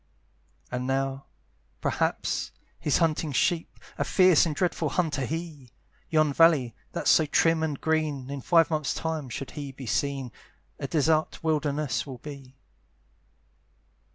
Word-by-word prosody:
And 125 +1 -3
now, 135 0 -1 0.5
perhaps, - - -1 0.3
he's 150 - +1
hunting 160 -2 +1
sheep, 165 +5 0 0.2
A - - +2
fierce 185 -3 +5
and 155 - -3
dreadful 165 -1 0
hunter 155 -6 0
he! 155 -3 -6 0.4
Yon 155 -2 +3
valley, 150 -7 +4 0.2
that's - - +2
so 155 - +4
trim 165 +2 +3
and 150 -3 -2
green, 150 -4 -1
In 140 -1 -4
five 165 +3 +4
months' 155 -3 0
time, 160 -4 -3
should 135 +3 -6
he 145 -3 -6
be 135 0 -10
seen, 135 +2 -1 0.5
A 140 - -3
desart 155 +3 +1
wilderness 150 -3 0
will 130 -2 -7
be. 135 -1 -10
150 Hz, 135 wpm, -27 LUFS, 135-160 Hz, 0.5 s, fierce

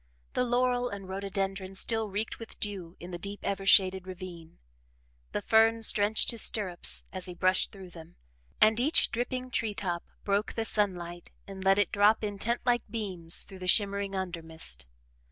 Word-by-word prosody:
The - - +1
laurel 245 0 +1
and 200 -3 -7
rhododendron 195 0 -3
still 220 +2 0
reeked 205 +3 -3
with 230 - -11
dew 190 -5 -4
in 175 +2 -9
the 175 - -5
deep, 200 +2 -6
ever 195 -1 -2
shaded 190 -1 +5
ravine. 180 -3 -9 0.7
The - - -3
ferns 225 0 +4
drenched 210 +3 +3
his 230 - -1
stirrups, 185 -5 -1
as 185 -1 -4
he 180 - -7
brushed 185 +1 +2
through 190 -3 -11
them, 165 -1 -13 0.4
and 220 +1 +5
each 295 +7 +3
dripping 255 +1 -3
tree 220 -4 -1
top 175 -4 -2 0.2
broke 200 +1 0
the 225 - -2
sunlight 175 -5 -2 0.2
and 195 -1 -7
let 195 0 +4
it 205 - +2
drop 210 +2 +4
in 205 -1 -3
tent 235 +3 0
like 240 -1 +3
beams 190 -7 +2
through 190 - -11
the 185 - -6
shimmering 200 0 +3
undermist. 165 - -5
200 Hz, 170 wpm, -29 LUFS, 185-220 Hz, 0.7 s, shaded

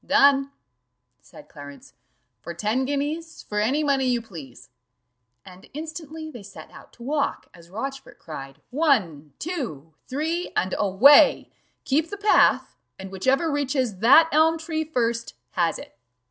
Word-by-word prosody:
"Done," 280 0 +4 0.7
said - - -16
Clarence, 145 -2 -13 0.5
"for 170 - -8
ten 215 +9 -1
guineas 295 +4 -4
for 210 - -3
any 265 +9 +1
money 275 -2 +1
you 245 -1 +1
please:" 140 - -12 0.7
and 185 0 -15
instantly 315 0 -7
they 240 - -10
set 200 0 -12
out - - -15
to 235 - -14
walk, 285 +2 -2
as 170 0 -17
Rochfort 270 +8 -7
cried 135 -4 -10
"one, 195 - 0
two, 230 - -5
three, 320 +6 -3
and 185 - 0
away; 215 +9 +5 0.3
keep 305 +4 +1
the 405 - -6
path, 410 +1 +3 0.2
and 190 0 -9
whichever 265 - +1
reaches 265 -8 -1
that 275 +9 +7
elm 320 +2 +3
tree 315 -1 -3
first 235 -6 -2 0.2
has 170 -2 0
it." - - -12
260 Hz, 140 wpm, -24 LUFS, 190-305 Hz, 0.7 s, that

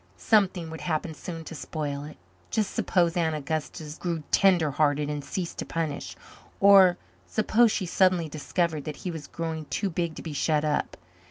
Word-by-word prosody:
Something 190 -6 +2
would 160 - -7
happen 160 -1 -2
soon 165 +1 -7
to 160 - -8
spoil 145 -2 -4
it. 150 - -11 0.3
Just 215 -3 -1
suppose 170 -2 +1
Aunt 165 -3 +1
Augusta 155 +1 -4
grew 170 -3 -2
tender 175 -6 +4
hearted 145 0 +1
and 145 -1 -4
ceased 175 +2 -4
to - - -3
punish! 160 -3 -3 0.4
Or 195 -3 +7 0.3
suppose 225 +1 +3
she 195 - -1
suddenly 180 -2 +3
discovered 155 0 -2
that 150 - -4
he 180 - -1
was 160 -3 -7
growing 160 -2 -4
too 195 +5 -2
big 170 -1 -2
to - - -8
be 160 - -5
shut 150 +1 +1
up! 150 -1 -1
165 Hz, 175 wpm, -27 LUFS, 155-180 Hz, 0.4 s, Or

